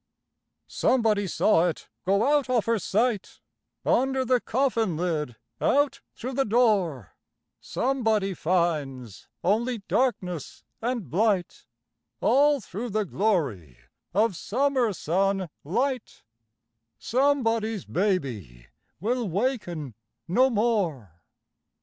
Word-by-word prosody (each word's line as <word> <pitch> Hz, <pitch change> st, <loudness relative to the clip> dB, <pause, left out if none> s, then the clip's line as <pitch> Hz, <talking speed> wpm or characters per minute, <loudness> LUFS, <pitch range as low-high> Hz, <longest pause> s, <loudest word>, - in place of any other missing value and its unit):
Somebody 220 Hz, -5 st, +1 dB
saw 180 Hz, -1 st, +3 dB
it 170 Hz, -, -4 dB, 0.2 s
go 200 Hz, +3 st, +3 dB
out 285 Hz, -3 st, 0 dB
of 245 Hz, -4 st, +2 dB
her 230 Hz, -1 st, +1 dB
sight, 215 Hz, +2 st, -1 dB, 0.5 s
Under 265 Hz, 0 st, +2 dB
the 250 Hz, -1 st, +2 dB
coffin 230 Hz, -, 0 dB
lid—out 155 Hz, -, -1 dB
through 255 Hz, +3 st, -5 dB
the 270 Hz, +2 st, +2 dB
door; 205 Hz, -, +1 dB, 0.5 s
Somebody 225 Hz, -7 st, 0 dB
finds 150 Hz, -, -1 dB, 0.2 s
only 225 Hz, +3 st, 0 dB
darkness 185 Hz, -, -1 dB, 0.2 s
and 235 Hz, -, -2 dB
blight 190 Hz, -, 0 dB, 0.5 s
All 285 Hz, +4 st, +4 dB
through 220 Hz, +5 st, -6 dB
the 215 Hz, 0 st, 0 dB
glory 145 Hz, -, -1 dB, 0.3 s
of 210 Hz, +1 st, +2 dB
summer 255 Hz, +3 st, +1 dB
sun 190 Hz, +1 st, 0 dB
light; 250 Hz, -, -2 dB, 0.7 s
Somebody's 230 Hz, -6 st, +1 dB
baby 125 Hz, -, -2 dB, 0.3 s
will 230 Hz, +3 st, -1 dB
waken 175 Hz, -, -2 dB, 0.3 s
no 255 Hz, +9 st, +4 dB
more. 180 Hz, -, -1 dB
210 Hz, 95 wpm, -26 LUFS, 170-245 Hz, 0.7 s, All